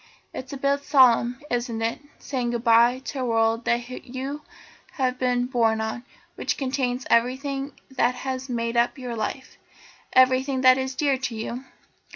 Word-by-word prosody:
It -, -, -6 dB
is 265 Hz, -, -10 dB
a -, -, -4 dB
bit 280 Hz, +1 st, +1 dB
solemn, 250 Hz, -3 st, +4 dB
isn't 240 Hz, -2 st, -1 dB
it, 230 Hz, +1 st, -1 dB, 0.2 s
saying 250 Hz, -4 st, -3 dB
goodbye 235 Hz, +2 st, +3 dB
to 275 Hz, -, -5 dB
a -, -, -1 dB
world 225 Hz, 0 st, +1 dB
that 240 Hz, 0 st, 0 dB, 0.2 s
you 265 Hz, +4 st, -5 dB, 0.5 s
have 255 Hz, -2 st, -1 dB
been 245 Hz, -1 st, +1 dB
born 230 Hz, -3 st, +1 dB
on; 220 Hz, +2 st, -4 dB, 0.3 s
which -, -, -2 dB
contains 255 Hz, -2 st, -2 dB
everything 270 Hz, +4 st, 0 dB, 0.2 s
that 250 Hz, -1 st, +1 dB
has 260 Hz, +1 st, -5 dB
made 235 Hz, -1 st, -2 dB
up 235 Hz, +4 st, +2 dB
your 250 Hz, -3 st, -5 dB
life, 230 Hz, +4 st, -5 dB, 0.5 s
everything 260 Hz, +1 st, +3 dB
that 255 Hz, 0 st, +6 dB
is 260 Hz, 0 st, -3 dB
dear 280 Hz, -2 st, +1 dB
to 245 Hz, -3 st, -3 dB
you?" 235 Hz, +4 st, -5 dB
255 Hz, 165 wpm, -24 LUFS, 235-265 Hz, 0.5 s, that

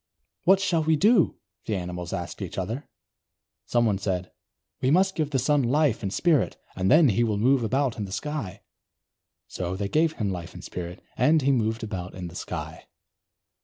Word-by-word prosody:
"What 190 Hz, +2 st, +6 dB
shall 175 Hz, -5 st, +1 dB
we 160 Hz, +1 st, +3 dB
do?" 200 Hz, +3 st, +4 dB, 0.3 s
the 110 Hz, -, 0 dB
animals 90 Hz, -2 st, -5 dB
asked 85 Hz, -3 st, -5 dB
one -, -, -3 dB
another. 110 Hz, +10 st, -4 dB, 0.8 s
Someone 115 Hz, -5 st, +2 dB
said: 95 Hz, -2 st, -2 dB, 0.5 s
"We 130 Hz, -, +2 dB
must 190 Hz, +5 st, +4 dB
give 155 Hz, -5 st, -1 dB
the 140 Hz, -, 0 dB
Sun 145 Hz, +3 st, +2 dB
life 135 Hz, 0 st, +2 dB
and 95 Hz, -, -3 dB
spirit, 160 Hz, -, +2 dB, 0.2 s
and 95 Hz, 0 st, 0 dB
then 155 Hz, -1 st, +6 dB
he 115 Hz, +3 st, +2 dB
will 110 Hz, -3 st, 0 dB
move 125 Hz, +4 st, +3 dB
about 130 Hz, +2 st, 0 dB
in 105 Hz, -, -2 dB
the 95 Hz, -, -9 dB
sky." 110 Hz, -, -4 dB, 0.8 s
So 90 Hz, 0 st, -4 dB
they 100 Hz, +1 st, -3 dB
gave 160 Hz, +4 st, +2 dB
him 105 Hz, -9 st, -2 dB
life 85 Hz, -2 st, -6 dB
and -, -, -9 dB
spirit, 90 Hz, 0 st, -7 dB
and 155 Hz, -1 st, +4 dB
he 140 Hz, -, +3 dB
moved 115 Hz, -2 st, 0 dB
about 90 Hz, -4 st, -5 dB
in 90 Hz, -1 st, -6 dB
the 85 Hz, -, -13 dB
sky. 80 Hz, -3 st, -6 dB
115 Hz, 185 wpm, -26 LUFS, 95-150 Hz, 0.8 s, What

